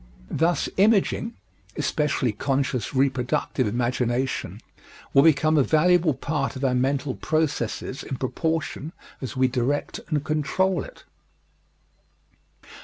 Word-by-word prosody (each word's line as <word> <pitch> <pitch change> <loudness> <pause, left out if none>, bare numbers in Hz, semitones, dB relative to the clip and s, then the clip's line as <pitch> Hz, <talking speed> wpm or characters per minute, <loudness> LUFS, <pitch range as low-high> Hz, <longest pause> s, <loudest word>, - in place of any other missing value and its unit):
Thus, 170 +2 +1
imaging 220 +3 +2 0.4
especially 140 -5 0
conscious 135 +1 -1
reproductive 130 -1 +1
imagination 120 +3 -1 0.5
will 135 - +7
become 155 0 +4
a - - +5
valuable 160 +1 +3
part 135 -2 -2
of 130 +1 -2
our 130 - +2
mental 135 +2 0
processes 145 -5 -2
in 135 - -5
proportion 160 +3 -2 0.3
as 130 -1 -5
we 130 0 +4
direct 130 +3 -1
and 150 -3 0
control 155 +5 0
it. - - -13
140 Hz, 110 wpm, -24 LUFS, 130-155 Hz, 0.5 s, will